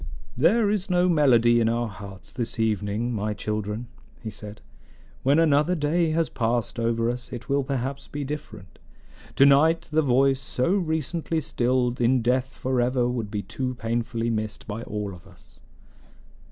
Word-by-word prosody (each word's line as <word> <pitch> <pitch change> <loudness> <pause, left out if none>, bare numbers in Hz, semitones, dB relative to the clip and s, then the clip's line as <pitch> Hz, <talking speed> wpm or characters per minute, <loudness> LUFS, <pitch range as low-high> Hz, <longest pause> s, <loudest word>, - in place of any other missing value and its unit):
"There 205 - +3
is 205 -2 -1
no 180 0 +3
melody 120 -8 +4
in 115 -1 +2
our 120 +1 0
hearts 100 -2 -10
this 120 -2 -4
evening, 110 +2 0
my 105 -1 -2
children," 105 +2 -3 0.3
he 110 -2 -6
said. 105 +1 -8 0.6
"When 140 +3 +3
another 160 +2 +3
day 160 +2 +1
has 160 0 +1
passed 120 -1 -1
over 115 0 +1
us 120 +1 -4
it 120 -2 -7
will 140 0 +2
perhaps 135 +1 -3
be 145 0 -5
different. 140 -10 -8 0.6
To 135 - +6
night 155 +4 +4
the 155 +1 +3
voice 135 -1 +3
so 130 +3 -1
recently 165 -2 -1
stilled 125 -3 0
in 120 0 +3
death 125 +2 +2
forever 125 -1 0
would 120 -4 -3
be 105 -1 -3
too 130 -1 -4
painfully 115 0 -2
missed 110 -2 -3
by 110 +1 -5
all 105 -4 -4
of 90 +2 -14
us." 90 -3 -21
125 Hz, 160 wpm, -25 LUFS, 115-145 Hz, 0.6 s, To